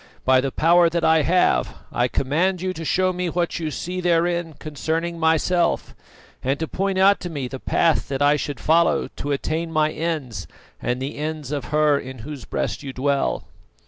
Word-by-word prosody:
By 130 Hz, 0 st, +5 dB
the 135 Hz, 0 st, -2 dB
power 170 Hz, +3 st, +4 dB
that 170 Hz, 0 st, -1 dB
I 160 Hz, 0 st, +5 dB
have, 155 Hz, -, +2 dB, 0.2 s
I 120 Hz, -, +1 dB
command 170 Hz, +9 st, 0 dB
you 185 Hz, +1 st, -2 dB
to 165 Hz, -, -7 dB
show 185 Hz, +3 st, +1 dB
me 180 Hz, 0 st, -2 dB
what 170 Hz, 0 st, -1 dB
you 160 Hz, -2 st, -2 dB
see 180 Hz, +4 st, -4 dB
therein 170 Hz, -2 st, +1 dB
concerning 160 Hz, +3 st, -3 dB
myself, 165 Hz, +2 st, +1 dB, 0.5 s
and 135 Hz, +2 st, 0 dB
to 160 Hz, -, -3 dB
point 195 Hz, +2 st, -1 dB
out 195 Hz, +1 st, +5 dB
to 175 Hz, -, -5 dB
me 140 Hz, -6 st, -4 dB
the 135 Hz, +1 st, -7 dB
path 165 Hz, +4 st, +1 dB
that 135 Hz, -1 st, -3 dB
I 145 Hz, +1 st, +4 dB
should 145 Hz, -2 st, -4 dB
follow 165 Hz, 0 st, +2 dB
to 145 Hz, -, -3 dB
attain 160 Hz, +4 st, -2 dB
my 155 Hz, -1 st, +2 dB
ends 155 Hz, -8 st, -3 dB, 0.3 s
and 125 Hz, +1 st, -1 dB
the 135 Hz, +2 st, -5 dB
ends 155 Hz, -2 st, -4 dB
of 145 Hz, -2 st, -3 dB
her 150 Hz, -1 st, +2 dB
in 130 Hz, 0 st, -8 dB
whose 145 Hz, -4 st, -7 dB
breast -, -, -3 dB
you 135 Hz, -2 st, -6 dB
dwell." 140 Hz, +1 st, 0 dB
160 Hz, 190 wpm, -22 LUFS, 140-170 Hz, 0.5 s, By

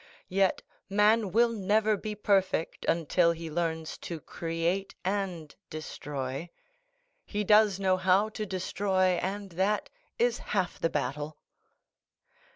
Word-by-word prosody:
Yet 190 Hz, 0 st, +2 dB, 0.3 s
man 210 Hz, 0 st, +3 dB
will 235 Hz, +3 st, +4 dB
never 215 Hz, 0 st, +2 dB
be 210 Hz, +1 st, -5 dB
perfect 195 Hz, -5 st, +1 dB
until 170 Hz, +1 st, +3 dB
he 165 Hz, -1 st, -7 dB
learns 160 Hz, -1 st, -2 dB
to 170 Hz, -2 st, -6 dB
create 170 Hz, +5 st, -2 dB
and 185 Hz, -6 st, -2 dB
destroy; 145 Hz, -1 st, -5 dB, 0.7 s
he 210 Hz, 0 st, -2 dB
does 210 Hz, -1 st, +5 dB
know 190 Hz, -1 st, +3 dB
how 190 Hz, +3 st, +3 dB
to 215 Hz, -1 st, -5 dB
destroy, 185 Hz, 0 st, +1 dB
and 200 Hz, +1 st, -3 dB
that 195 Hz, +5 st, 0 dB, 0.3 s
is 485 Hz, +1 st, +2 dB
half 190 Hz, -4 st, -2 dB
the 165 Hz, -, +1 dB
battle." 145 Hz, +2 st, -3 dB
185 Hz, 120 wpm, -29 LUFS, 165-205 Hz, 0.7 s, does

